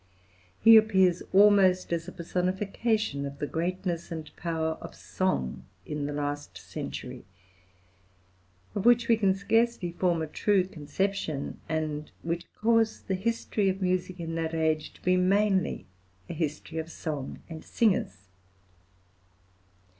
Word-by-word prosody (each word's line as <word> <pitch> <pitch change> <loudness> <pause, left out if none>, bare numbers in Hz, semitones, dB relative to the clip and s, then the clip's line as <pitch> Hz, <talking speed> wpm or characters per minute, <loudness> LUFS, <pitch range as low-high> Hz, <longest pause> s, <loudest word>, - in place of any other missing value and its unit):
He 225 0 +9
appears 190 -5 +4
almost 190 -3 +5
as 170 0 -2
a - - -6
personification 185 0 -1
of 140 0 -6
the 145 - -2
greatness 175 +2 -3
and 160 -2 -7
power 160 -1 -1
of - - -9
song 185 - -2 0.2
in 150 -1 -3
the - - -3
last 145 0 -4
century, - - -7 1.5
of 200 - -2
which 240 +1 +5
we 230 - +5
can 195 -4 +2
scarcely 225 -2 +1
form 170 -2 0
a - - -1
true 195 +4 +2
conception, 160 -2 -3
and 155 -1 -2
which 170 +1 -3
cause 225 0 +2
the 190 - -2
history 210 0 0
of 190 0 -2
music 185 -1 -1
in 165 -1 -4
that 165 0 -2
age 160 -1 0
to - - -21
be 185 0 +3
mainly 190 - +2 0.4
a - - -5
history 155 +1 -3
of 160 0 -5
song 150 -6 -5
and 160 -2 -8
singers. 100 - 0
180 Hz, 135 wpm, -28 LUFS, 160-195 Hz, 1.5 s, He